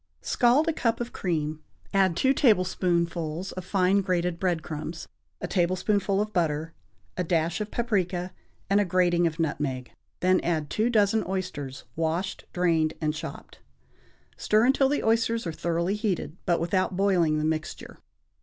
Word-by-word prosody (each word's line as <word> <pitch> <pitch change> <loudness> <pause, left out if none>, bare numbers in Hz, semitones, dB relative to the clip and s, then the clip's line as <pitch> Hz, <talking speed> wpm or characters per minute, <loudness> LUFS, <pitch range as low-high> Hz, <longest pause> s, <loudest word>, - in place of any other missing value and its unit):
= - - -44
Scald 255 +6 +4
a 325 - +2
cup 230 -5 0
of 240 0 -5
cream, 155 -4 -2 0.3
add 190 -3 +3
two 265 +8 +3
tablespoonfuls 180 - +1
of 185 - -6
fine 190 +1 +2
grated 180 -2 -1
bread 175 -4 0
crumbs, 160 +1 -6 0.3
a - - -4
tablespoonful 195 +2 +1
of 210 +1 -2
butter, 160 -1 0 0.4
a 180 - 0
dash 165 +2 0
of 210 - -3
paprica 185 -7 -1 0.4
and 200 +1 +3
a - - +1
grating 175 -1 +2
of 165 +1 -5
nutmeg; 140 -5 -2 0.3
then 185 +1 +4
add 160 -4 -1
two 220 +3 +1
dozen 215 -1 +3
oysters, 180 -9 -4
washed, 165 +4 -2
drained 165 -3 +1
and 155 -1 0
chopped. 155 - -8 0.8
Stir 215 +2 +3
until 270 +1 +3
the 290 - 0
oysters 230 0 +1
are 165 - -3
thoroughly 170 +3 -1
heated, 200 -8 -2
but 175 -1 +3
without 185 +2 0
boiling 180 -6 +3
the 155 - 0
mixture. 155 0 -4
180 Hz, 155 wpm, -26 LUFS, 165-200 Hz, 0.8 s, Scald